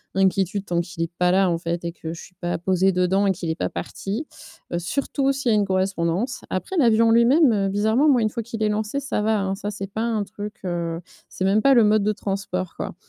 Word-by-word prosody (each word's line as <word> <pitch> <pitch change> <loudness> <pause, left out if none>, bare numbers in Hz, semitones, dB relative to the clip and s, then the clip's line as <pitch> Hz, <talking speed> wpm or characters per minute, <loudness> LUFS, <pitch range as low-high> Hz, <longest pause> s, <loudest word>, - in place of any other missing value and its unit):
l'inquiétude 195 +1 +1
tant 170 -1 0
qu'il 165 -1 -5
est 165 - -4
pas 180 0 +3
là 190 0 +3
en 170 - +1
fait, 170 0 -3
et 170 - -2
que 165 -1 -7
je 170 - -9
suis 180 - -15
pas 175 -1 -2
posée 190 +1 +2
dedans 185 +2 +2
et - - +4
qu'il 175 -2 -4
est - - -2
pas - - -2
parti. 220 +10 -5 0.5
Heu, 175 - 0
surtout 275 - -1
s'il 270 -3 -1
y - - +4
a - - +3
une 205 - +2
correspondance. 190 +5 -1
Après, 185 - -3
l'avion, 230 -4 +4
en - - +4
lui-même, 245 +5 +5
heu, 195 -1 +1
bizarrement, 220 +9 +2
moi, 250 -4 +4
une 215 - +2
fois 235 - -3
qu'il 225 -1 -4
est 210 - +2
lancé, 215 +6 -1
ça 270 -6 -2
va, 215 -1 +1
hein! 190 0 -1
Ça, 205 +1 -5
c'est 195 -1 -6
pas 220 - -3
un 225 -3 0
truc, 210 +1 -7
heu. 170 -1 -2 0.3
C'est 190 - -3
même 205 +3 +3
pas 275 0 +6
le 235 - +6
mode 210 -1 +3
de 210 - +2
transport, 195 -3 -4
quoi. - - -5
195 Hz, 255 wpm, -23 LUFS, 180-220 Hz, 0.5 s, pas